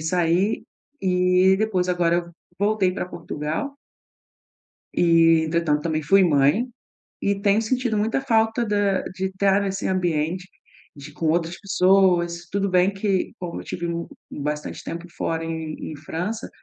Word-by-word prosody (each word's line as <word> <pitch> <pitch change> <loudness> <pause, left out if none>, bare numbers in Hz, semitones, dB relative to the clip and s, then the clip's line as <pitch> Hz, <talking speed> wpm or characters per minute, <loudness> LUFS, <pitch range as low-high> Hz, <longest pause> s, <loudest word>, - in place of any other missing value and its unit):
sair 175 +5 +1 0.4
e 180 0 +4
depois 190 -4 0
agora 175 -1 +2
eu 170 0 -3 0.3
voltei 205 -2 +2
pra - - -3
Portugal 165 - -4 1.2
e 165 -1 +4
entretanto 155 -2 +1
também 155 -2 -1
fui 195 +5 +5
mãe, 150 - +3 0.6
e 200 0 0
tenho 205 +1 +3
sentido 245 -1 0
muita 220 +5 0
falta 225 -2 +2
da 205 -2 +1
de 190 +1 -4
estar 195 +1 +2
neste 195 0 -2
ambiente 180 -1 -1 0.5
de 145 +2 -10
com 160 - -3
outras 170 +1 0
pessoas. 180 -3 +2
Tudo 200 0 0
bem 180 +2 +3
que 195 -1 -1
como 175 -2 -5
eu - - -10
tive 175 -1 -4
mu 170 0 -3 0.2
bastante 150 +1 -4
tempo 170 +1 -6
fora 165 0 -2
em 160 -1 -4 0.2
em - - -8
França, 175 +9 -4
180 Hz, 145 wpm, -23 LUFS, 165-200 Hz, 1.2 s, fui